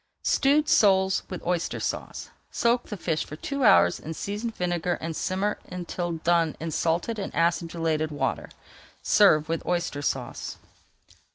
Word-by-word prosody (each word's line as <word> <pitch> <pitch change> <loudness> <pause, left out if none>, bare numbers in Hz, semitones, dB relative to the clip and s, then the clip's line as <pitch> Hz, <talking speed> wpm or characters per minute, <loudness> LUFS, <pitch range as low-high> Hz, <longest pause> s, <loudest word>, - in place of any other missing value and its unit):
STEWED 295 +2 +3
SOLES 190 -7 +4
WITH 185 - -7
OYSTER 175 -1 -1
SAUCE - - -4 0.2
Soak 235 +1 +1
the 210 - -5
fish 165 -3 -1
for 155 - -9
two 280 - -3
hours 200 -4 +5
in 160 +1 -7
seasoned 210 +6 -4
vinegar 175 -1 -1
and 165 0 -4
simmer 195 +5 -1
until 175 -1 -4
done 165 -1 +1
in 165 0 -4
salted 170 +9 0
and 195 - -4
acidulated 165 -2 0
water. 145 - -2 0.5
Serve 155 -8 +5
with 165 0 -2
Oyster 175 -5 -2
Sauce. 130 -4 -3
175 Hz, 145 wpm, -26 LUFS, 165-200 Hz, 0.5 s, hours